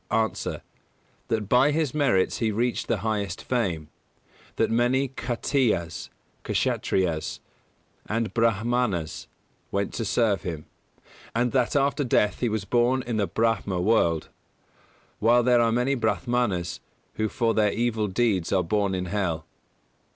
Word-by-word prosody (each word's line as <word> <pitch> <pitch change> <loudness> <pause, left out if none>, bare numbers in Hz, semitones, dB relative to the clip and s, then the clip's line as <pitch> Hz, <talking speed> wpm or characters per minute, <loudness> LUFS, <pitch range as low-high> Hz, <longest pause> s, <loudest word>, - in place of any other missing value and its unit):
_ 110 0 0
A. - - -9 0.6
That 110 -3 -1
by 125 +6 +5
his 150 -3 0
merits 135 -11 +2
he 115 - 0
reached 120 +3 -1
the 105 - 0
highest 105 -4 -2
fame; 90 -12 -1 0.7
that - - +1
many 125 +4 +2
Khattiyas 120 - -1 0.3
(Kshattriyas) 85 -5 0 0.7
and 115 +1 -1
Brāhmanas 115 -6 0 0.4
went 100 0 -2
to 115 - -2
serve 110 -2 +1
him; 80 -5 -5 0.7
and 120 +1 +1
that 125 -1 +1
after 140 +1 +2
death 105 -5 +2
he 120 - +1
was 105 -2 -2
born 125 +3 +2
in 120 -2 -3
the 100 -2 +1
Brāhma 110 -5 0
world: 90 -5 +2 0.9
while 120 +2 +4
there 120 -1 +4
are 115 -1 +3
many 125 +4 +1
Brāhmanas 120 -8 -1 0.4
who 110 0 0
for 115 0 0
their 105 -2 +3
evil 115 -2 0
deeds 100 -3 0
are 95 -2 +2
born 100 +2 0
in 90 0 -2
hell. 90 -4 -2
110 Hz, 135 wpm, -26 LUFS, 95-120 Hz, 0.9 s, by